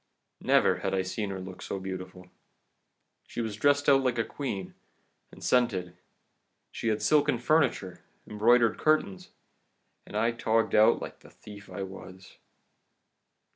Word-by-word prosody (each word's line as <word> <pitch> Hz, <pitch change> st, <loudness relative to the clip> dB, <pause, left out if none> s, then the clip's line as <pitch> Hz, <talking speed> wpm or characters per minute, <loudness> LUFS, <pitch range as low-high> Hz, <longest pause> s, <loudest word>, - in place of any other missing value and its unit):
Never -, -, +3 dB
had -, -, -2 dB
I 95 Hz, -, 0 dB
seen 100 Hz, +2 st, -4 dB
her 95 Hz, -1 st, -5 dB
look 95 Hz, 0 st, -9 dB
so -, -, -4 dB
beautiful. 95 Hz, -1 st, -7 dB, 1.0 s
She -, -, -7 dB
was 110 Hz, -3 st, -3 dB
dressed 145 Hz, +5 st, +2 dB
out 135 Hz, -1 st, +6 dB
like 125 Hz, -2 st, 0 dB
a 115 Hz, -, +2 dB
queen, 105 Hz, -11 st, -5 dB, 0.6 s
and -, -, -14 dB
scented; 95 Hz, -8 st, +1 dB, 0.8 s
she -, -, -5 dB
had 110 Hz, -1 st, 0 dB
silken 150 Hz, -3 st, +3 dB
furniture, 120 Hz, -, 0 dB, 0.3 s
embroidered 115 Hz, +2 st, +3 dB
curtains 155 Hz, -12 st, 0 dB, 0.8 s
and 105 Hz, -, -5 dB
I 115 Hz, +2 st, +2 dB
togged 115 Hz, -1 st, 0 dB
out 110 Hz, +2 st, +4 dB
like -, -, -9 dB
the -, -, -17 dB
thief 100 Hz, -1 st, -13 dB
I 100 Hz, -, -5 dB
was! 95 Hz, 0 st, -11 dB
110 Hz, 140 wpm, -28 LUFS, 95-120 Hz, 1.0 s, out